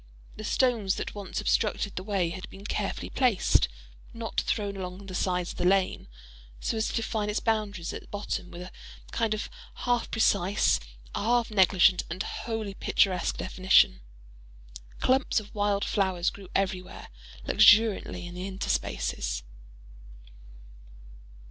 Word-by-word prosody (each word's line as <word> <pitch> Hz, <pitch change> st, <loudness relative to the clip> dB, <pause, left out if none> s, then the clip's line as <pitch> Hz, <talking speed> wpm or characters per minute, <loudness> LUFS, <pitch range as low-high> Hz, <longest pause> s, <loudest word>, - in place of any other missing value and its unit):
The 215 Hz, -, -8 dB
stones 225 Hz, -5 st, +2 dB
that -, -, -4 dB
once 200 Hz, -2 st, -5 dB
obstructed 205 Hz, -2 st, 0 dB
the -, -, -3 dB
way 190 Hz, -3 st, 0 dB
had 185 Hz, +1 st, -7 dB
been 195 Hz, +1 st, -12 dB
carefully -, -, -3 dB
placed—not 65 Hz, -, 0 dB
thrown—along 195 Hz, -2 st, -3 dB
the 190 Hz, -, -8 dB
sides 180 Hz, -1 st, -1 dB
of -, -, -10 dB
the -, -, 0 dB
lane, 190 Hz, +1 st, +2 dB, 0.5 s
so -, -, -2 dB
as 220 Hz, 0 st, 0 dB
to -, -, -3 dB
define 220 Hz, -2 st, -1 dB
its 210 Hz, -, 0 dB
boundaries 210 Hz, -6 st, -1 dB
at -, -, -8 dB
bottom 205 Hz, -3 st, -4 dB
with 175 Hz, 0 st, -8 dB
a 185 Hz, -, -10 dB, 0.4 s
kind 225 Hz, -2 st, 0 dB
of 215 Hz, -, -4 dB, 0.3 s
half 245 Hz, -1 st, 0 dB
precise, 200 Hz, -3 st, +2 dB, 0.3 s
half 235 Hz, +1 st, +1 dB
negligent, 190 Hz, -2 st, +5 dB
and 180 Hz, +5 st, -3 dB
wholly 220 Hz, -3 st, -4 dB
picturesque 185 Hz, -2 st, +1 dB
definition. 185 Hz, -, +3 dB, 1.0 s
Clumps 260 Hz, -2 st, +2 dB
of 210 Hz, -1 st, -12 dB
wild 205 Hz, -1 st, +1 dB
flowers 190 Hz, -3 st, +1 dB
grew 195 Hz, -2 st, -11 dB
everywhere, 190 Hz, -2 st, -2 dB, 0.4 s
luxuriantly, 205 Hz, -5 st, +5 dB
in 175 Hz, -, -8 dB
the 180 Hz, +2 st, -5 dB
interspaces. -, -, -2 dB
195 Hz, 130 wpm, -28 LUFS, 180-215 Hz, 1.0 s, negligent